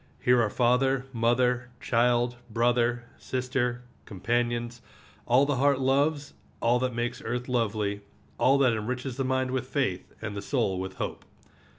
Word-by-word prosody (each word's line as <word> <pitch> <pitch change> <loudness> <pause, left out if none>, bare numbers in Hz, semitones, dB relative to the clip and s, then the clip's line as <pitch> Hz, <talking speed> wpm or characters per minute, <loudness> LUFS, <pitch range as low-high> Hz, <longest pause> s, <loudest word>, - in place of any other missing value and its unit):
Here 125 -1 +4
are 110 - +1
father, 125 +3 +2
mother, 125 +2 +1
child, 120 +1 +1
brother, 120 +1 +1 0.2
sister, 125 -1 -2 0.2
companions, 120 +3 -2 0.5
all 130 +4 +5
the 145 -2 0
heart 140 +1 +3
loves, 140 +3 +1 0.3
all 120 +1 +2
that 125 -1 -1
makes 120 +1 -2
earth 125 +2 -3
lovely, 105 -4 -1 0.4
all 135 +2 +4
that 130 -4 +4
enriches 125 +4 -3
the 135 - 0
mind 130 0 0
with 130 -1 -2
faith 130 -11 -2
and 110 -2 -5
the 100 - -4
soul 100 -6 0
with 95 0 -5
hope. - - -5
120 Hz, 150 wpm, -27 LUFS, 115-130 Hz, 0.5 s, all